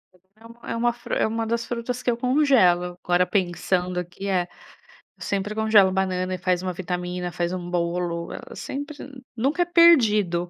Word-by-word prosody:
Então 205 +6 -18
é - - -4
uma 240 +1 +1
fru 240 - -8
é - - +2
uma 225 +1 -2
das 235 +1 -1
frutas 245 +1 -4
que 245 - +2
eu - - -1
congelo, 235 -10 +3
agora 180 0 +2
pensando 180 -1 -1
aqui, 180 +3 -7
é. 180 -3 0 0.7
Eu - - -9
sempre 200 +1 -2
congelo 215 -3 +4
banana 185 -1 -1
e - - -6
faz 180 0 0
uma 185 -1 -3
vitamina, 180 0 -4
faz 175 +1 -2
uma 175 -1 -5
bolo, 170 -1 -2
ela - - -9
sempre 285 +2 -6 0.4
nunca 275 +9 0
é - - +3
perdido. 215 - +4
190 Hz, 175 wpm, -24 LUFS, 180-235 Hz, 0.7 s, congelo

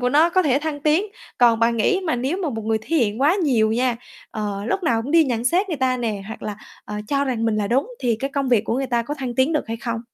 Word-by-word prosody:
của 250 - +1
nó 315 +5 +4
có 370 +1 +3
thể 280 -4 +2
thăng 295 -1 -4
tiến. 310 +7 +2 0.3
Còn 235 -2 +5
bạn 230 0 +2
nghĩ 375 - +2
mà 315 - +1
nếu 265 +8 -1
mà 325 - 0
một 225 -3 -5
người 220 0 +1
thể 325 +8 -2
hiện 225 -2 +1
quá 300 +5 +4
nhiều 245 - +2
nha, 245 0 +1 0.3
ờ, 205 -2 -4
lúc 385 - -1
nào 230 -8 +1
cũng 260 - -6
đi 330 0 +5
nhận 240 -4 -2
xét 365 +10 +2
người 325 - -2
ta 260 -1 +1
nè 220 -5 -3
hoặc 220 - -8
là, 210 -1 -4 0.3
ờ, 210 - -7
cho 280 -1 +1
rằng 245 -4 -1
mình 225 -2 +1
là 210 -1 0
đúng 270 - +1
thì 235 -3 +1
cái 275 - -2
công 275 -1 -1
việc 235 -4 +3
của 230 - -1
người 270 0 -1
ta 240 -2 0
có 290 +5 -4
thăng 255 -4 -5
tiến 260 +6 +2
được 300 - 0
hay 225 - -3
không? 230 0 -4
250 Hz, 295 wpm, -22 LUFS, 225-295 Hz, 0.3 s, Còn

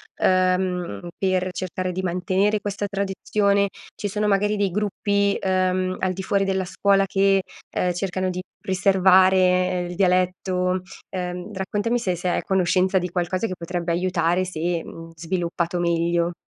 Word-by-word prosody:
ehm, 185 - +1
per 185 -1 0
cercare 185 0 -3
di 185 +1 -3
mantenere 185 +3 0
questa 205 0 -3
tradizione? 200 0 +1 0.3
Ci 205 - -3
sono, 210 +1 -1
magari, 205 +1 +2
dei 200 -2 0
gruppi, 200 0 0
uhm, 185 0 0
al 185 -1 0
di 190 +1 -6
fuori 195 +1 +1
della 190 -1 0
scuola 195 +2 +2
che, 195 0 +3 0.3
ehm, 180 - 0
cercano 185 +1 -2
di 180 0 -3 0.2
preservare, 190 0 +4
ehm, 180 -1 +2
il 175 - -6
dialetto? 180 0 +1 0.3
Ehm, 180 +1 -5
raccontami 205 +5 -1
se 185 -6 -1
sei 175 +1 -1
a - - -2
conoscenza 185 0 +2
di 180 0 -1
qualcosa 180 +3 -1
che 185 - -3
potrebbe 170 0 -3
aiutare 175 0 +1
se, 170 -1 -2
mhmm, 165 0 -10
sviluppato 170 +1 -2
meglio. 170 0 +1
185 Hz, 150 wpm, -23 LUFS, 180-195 Hz, 0.3 s, preservare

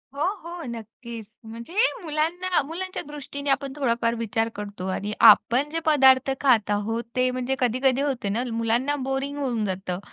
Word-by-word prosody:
हो, 285 - -5 0.2
हो, 345 +1 -7
नक्कीच. 230 -1 -8 0.2
म्हणजे 230 +7 -9 0.3
मुलांना 340 +4 0
मुलांच्या 370 +4 -4
दृष्टीने 285 -1 -6
आपण 275 0 0
थोडाफार 235 -4 0
विचार 225 0 -1
करतो 205 -2 -6
आणि 205 +2 -3
आपण 260 +5 +5
जे 325 +2 -2
पदार्थ 270 -3 +5
खात 245 -7 +3
आहोत 220 +3 -1
ते 255 0 +2
म्हणजे 255 +1 -2
कधी-कधी 255 +2 +2
होते 265 -8 -1
ना, 225 +5 -1
मुलांना 230 +5 0
बोरिंग 270 +2 -2
होऊन 250 -6 -1
जातं. 185 -2 -3
255 Hz, 155 wpm, -24 LUFS, 225-285 Hz, 0.3 s, आपण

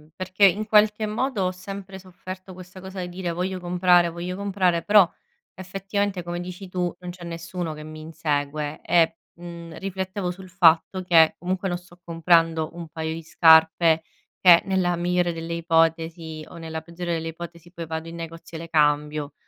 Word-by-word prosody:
perché 185 +2 +2
in 205 +3 0
qualche 210 0 +4
modo 215 0 -1
ho 180 - 0
sempre 190 +1 -8
sofferto 185 +1 -10
questa 185 +1 -12
cosa 190 0 -8
di 180 - -5
dire: 175 -1 -4
"Voglio 185 +2 -3
comprare, 175 -1 +3
voglio 175 +2 -5
comprare" 190 -3 0
però 205 -3 +6 0.5
effettivamente, 195 +1 -3
come 175 0 -4
dici 180 +2 -8
tu, 180 -1 -1
non 180 -1 -7
c'è 175 -1 -11
nessuno 170 0 -5
che 150 - -9
mi 155 0 -9
insegue 150 -1 -3
e, 165 -1 +2 0.2
mhmm, 170 -1 -9
riflettevo 190 -1 -3
sul 185 +1 -11
fatto 180 +1 +3
che 165 -3 +5
comunque 185 +2 -2
non 175 - -1
sto 175 0 -18
comprando 165 -1 +2
un 170 -1 -8
paio 160 0 -4
di 165 - -6
scarpe, 160 0 +5 0.4
che 175 -2 +8
nella 185 -2 +1
migliore 175 0 +1
delle 165 0 -5
ipotesi 165 -1 0
o - - -11
nella 160 -1 -6
peggiore 170 +1 -5
delle 165 0 -3
ipotesi 170 +1 -10
poi 170 -2 -7
vado 160 +1 -5
in 165 - -8
negozio 165 0 -8
e 160 - -7
le 165 - -9
cambio. 150 -1 +1
175 Hz, 175 wpm, -24 LUFS, 165-185 Hz, 0.5 s, che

